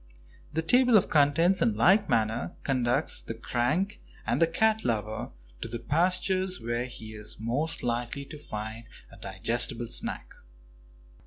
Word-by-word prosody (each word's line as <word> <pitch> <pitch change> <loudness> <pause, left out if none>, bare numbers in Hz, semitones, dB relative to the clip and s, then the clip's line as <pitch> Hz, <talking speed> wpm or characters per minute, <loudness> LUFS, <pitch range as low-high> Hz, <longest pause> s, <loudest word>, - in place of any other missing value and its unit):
The 160 +1 -1
table 245 +5 +5
of 195 - +1
contents, 160 +5 +3
in 110 - +2
like 195 - +4
manner, 110 +1 0
conducts 130 +1 +1
the 115 - -6
crank 125 - -1 0.2
and - - 0
the 165 - +6
cat 220 +6 +2
lover 110 -2 -2 0.3
to - - -3
the 120 +1 -4
pastures 185 - +1
where 120 +1 -2
he 110 -3 -9
is 105 0 -6
most 130 +9 -2
likely 120 +3 -2
to 150 - -10
find 110 -2 -6 0.3
a - - -14
digestible 115 +5 -1
snack. - - -3
125 Hz, 145 wpm, -28 LUFS, 115-170 Hz, 0.3 s, the